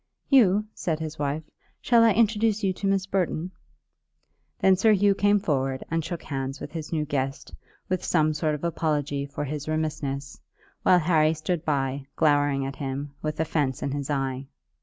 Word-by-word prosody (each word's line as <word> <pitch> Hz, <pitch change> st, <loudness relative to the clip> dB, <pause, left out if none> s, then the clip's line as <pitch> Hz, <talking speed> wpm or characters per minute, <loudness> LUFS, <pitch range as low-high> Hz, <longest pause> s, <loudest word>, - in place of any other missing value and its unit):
"Hugh," 210 Hz, -6 st, +5 dB
said 160 Hz, -3 st, -2 dB
his 155 Hz, -1 st, -6 dB
wife, 145 Hz, +2 st, -1 dB, 0.4 s
"shall 235 Hz, -2 st, +4 dB
I 225 Hz, -2 st, +5 dB
introduce 220 Hz, 0 st, +2 dB
you 190 Hz, -1 st, +2 dB
to 195 Hz, -, -3 dB
Miss 195 Hz, -1 st, +1 dB
Burton?" 185 Hz, -2 st, -1 dB, 1.1 s
Then 190 Hz, -1 st, +5 dB
Sir 215 Hz, +4 st, +4 dB
Hugh 200 Hz, 0 st, +4 dB
came 205 Hz, +1 st, +3 dB
forward 135 Hz, -8 st, -1 dB
and 165 Hz, 0 st, 0 dB
shook 170 Hz, +1 st, -5 dB
hands 135 Hz, -1 st, -4 dB
with -, -, -7 dB
his 160 Hz, -2 st, -6 dB
new 155 Hz, -2 st, 0 dB
guest, 135 Hz, -1 st, -3 dB, 0.3 s
with 185 Hz, -1 st, -1 dB
some 155 Hz, -2 st, +2 dB
sort 155 Hz, 0 st, 0 dB
of 150 Hz, -, -9 dB
apology 150 Hz, -4 st, -1 dB
for 140 Hz, -, -5 dB
his 150 Hz, +1 st, -5 dB
remissness, 145 Hz, -3 st, -3 dB, 0.4 s
while 180 Hz, -, +5 dB
Harry 160 Hz, -2 st, +3 dB
stood 155 Hz, +1 st, -2 dB
by, 135 Hz, -2 st, -1 dB
glowering 145 Hz, -3 st, +2 dB
at 135 Hz, 0 st, -5 dB
him, 140 Hz, 0 st, -4 dB
with 155 Hz, 0 st, -3 dB
offence 145 Hz, -4 st, 0 dB
in 140 Hz, -, -1 dB
his 140 Hz, 0 st, -4 dB
eye. 135 Hz, -2 st, -2 dB
155 Hz, 175 wpm, -26 LUFS, 140-185 Hz, 1.1 s, Hugh